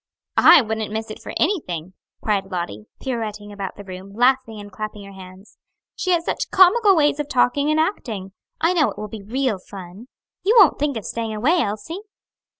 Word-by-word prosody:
"I 280 - +8
wouldn't 220 -1 -3
miss 220 0 -4
it - - -9
for - - -7
anything!" 185 - -1 0.3
cried 205 -3 0
Lottie, 140 - -4
pirouetting 215 -5 -4
about 200 -2 -6
the 205 - -10
room, 190 +1 -10
laughing 245 -2 +2
and 205 0 -10
clapping 210 +1 -6
her 200 - -11
hands; 190 +1 -14 0.4
"she 370 - -3
has 340 -2 +2
such - - -2
comical 390 +2 +6
ways 295 -2 +2
of 295 -1 -3
talking 280 +3 +2
and 310 0 +2
acting. 225 - -2 0.3
I 335 +3 +2
know 315 -5 +3
it - - -9
will 210 0 -6
be 215 0 -8
real 235 0 -1
fun. 190 +4 -11 0.3
You 430 +5 +2
won't 385 -7 +6
think 285 -3 0
of 215 - -6
staying 225 -2 -3
away, 295 +12 +2
Elsie?" 230 - -4
220 Hz, 190 wpm, -22 LUFS, 200-295 Hz, 0.4 s, I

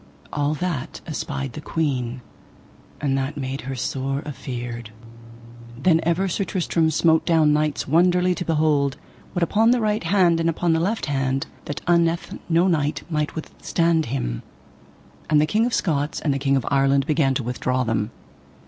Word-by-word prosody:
All 145 +1 0
that 165 -5 -3
espied 140 -4 -4
the 150 - -7
queen, 130 -7 -2 0.8
and 140 -2 0
that 135 +3 -3
made 135 0 -3
her 135 - -3
sore 135 +2 -2
afeard. 120 -5 -6 0.9
Then 160 +5 +3
ever 170 +4 +1
Sir 190 +2 -1
Tristram 170 -4 0
smote 160 +1 +3
down 160 -3 +4
knights 150 -1 0
wonderly 180 +4 +3
to 180 - -4
behold, 150 -4 +1 0.4
what 175 - 0
upon 220 +7 +3
the 245 0 +4
right 215 -3 0
hand 175 -1 +3
and 165 0 +2
upon 165 +1 +1
the 160 - +2
left 205 +7 -1
hand, 135 -2 -1 0.2
that 145 - -5
unnethe 170 -1 +1
no 170 +2 +4
knight 150 -4 0
might 150 -1 -1
withstand 165 0 0
him. 85 - -3 0.9
And 150 -1 +5
the 150 - +4
King 220 +8 +2
of 245 - -4
Scots 145 -4 0
and 145 - 0
the 135 - -2
King 140 0 +2
of 130 - -2
Ireland 135 0 +3
began 145 -4 +2
to 130 - -1
withdraw 125 +1 -1
them. 110 -2 -1
150 Hz, 165 wpm, -23 LUFS, 135-170 Hz, 0.9 s, And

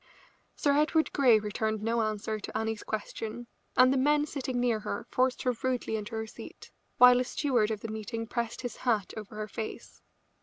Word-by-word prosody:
Sir 285 -1 +2
Edward 310 +2 +2
Grey 250 -6 +6
returned 215 0 -2
no 230 +1 +1
answer 215 0 -2
to - - -5
Annie's 220 -1 -2
question, 220 +2 -5 0.3
and 255 +1 +7
the - - +1
men 295 +2 +3
sitting 260 -4 -3
near 240 -3 +2
her 205 -1 -4
forced 255 0 +1
her 250 - +2
rudely 250 -3 -1
into 215 +1 -5
her 220 0 -2
seat, 220 - -11 0.3
while 250 0 +8
a - - +2
steward 250 -5 +1
of 215 -2 -3
the - - -5
meeting 220 +1 -4
pressed 235 0 -3
his 245 -3 -5
hat 220 -7 0
over 215 -1 -8
her 215 0 -4
face. 220 +1 -7
225 Hz, 190 wpm, -29 LUFS, 215-255 Hz, 0.3 s, while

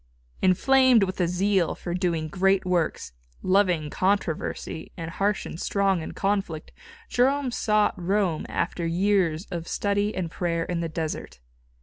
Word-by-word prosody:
Inflamed 255 +5 +5
with 185 -1 -2
a 175 - +2
zeal 185 0 +1
for 175 - -5
doing 170 -3 -1
great 195 +3 +2
works, 170 - -1 0.3
loving 180 -6 +2
controversy 185 -4 -2
and 165 0 -5
harsh 200 +3 0
and 165 - -7
strong 195 -3 +1
in - - -6
conflict, 195 -6 -2 0.4
Jerome 265 +1 +1
sought 215 -3 +2
Rome 185 -3 0
after 170 0 -2
years 175 -1 +1
of 170 -1 -4
study 205 +1 0
and 175 -3 -3
prayer 170 -2 -1
in 175 0 -3
the 165 -1 -2
desert. 160 - -5
185 Hz, 140 wpm, -25 LUFS, 165-200 Hz, 0.4 s, Inflamed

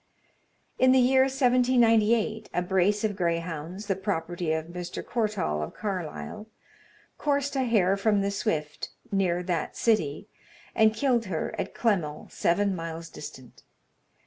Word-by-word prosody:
In 255 0 +6
the 260 - +5
year 260 +1 +5
1798, 235 -4 +3
a 180 - +1
brace 190 +3 +2
of 210 -2 0
greyhounds, 170 +1 -3
the 195 -2 0
property 175 -3 -2
of 160 0 -1
Mr. 175 +1 -6
Courtall 210 - -1
of 75 - -5
Carlisle, 200 +2 -5 0.7
coursed 285 -1 0
a 265 -1 +1
hare 195 -5 +3
from 205 0 +2
the 200 0 0
Swift, 155 -7 -2 0.2
near 180 -3 +1
that 175 -3 -2
city, 205 -6 +1 0.5
and 220 0 +4
killed 240 -1 +1
her 170 -5 -3
at - - -4
Clemmell, 180 -10 -1
seven 195 +3 +1
miles 165 -1 -6
distant. 130 -4 -11
200 Hz, 135 wpm, -27 LUFS, 170-225 Hz, 0.7 s, In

